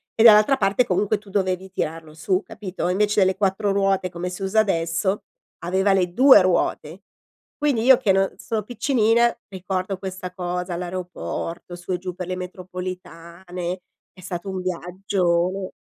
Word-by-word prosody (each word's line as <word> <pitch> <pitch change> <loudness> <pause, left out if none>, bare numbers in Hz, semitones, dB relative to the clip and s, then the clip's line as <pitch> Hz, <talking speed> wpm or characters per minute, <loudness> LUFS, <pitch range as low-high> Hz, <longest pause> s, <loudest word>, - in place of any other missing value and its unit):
e 225 - +3
dall'altra 220 +4 +7
parte 200 +3 +2
comunque 200 +3 +1
tu 205 -1 -17
dovevi 190 -1 -1
tirarlo 160 -3 -4
su, 185 +4 0
capito, 190 -4 -5
invece 210 +3 +2
delle 190 0 +3
4 200 0 +1
ruote 195 -2 +1
come 175 +1 -5
si 180 - -8
usa 205 +3 +2
adesso, 190 +1 -1 0.4
aveva 190 +3 +1
le 180 -2 +1
2 265 +1 +8
ruote. 180 -1 0 0.6
Quindi 285 -7 +1
io 260 +1 +7
che 235 -6 +2
non 195 0 +2
sono 220 -2 -3
piccinina, 235 0 +2
ricordo 190 0 -3
questa 185 -1 -6
cosa, 180 -1 -3
l'aeroporto 175 -1 -5
su 175 +1 -8
e - - 0
giù 180 0 -6
per 180 -1 -6
le 185 - -2
metropolitane, 180 -1 -7 0.3
è 185 - -15
stato 180 +2 -5
un 190 -1 -3
viaggio 185 0 -1
185 Hz, 155 wpm, -23 LUFS, 180-200 Hz, 0.6 s, 2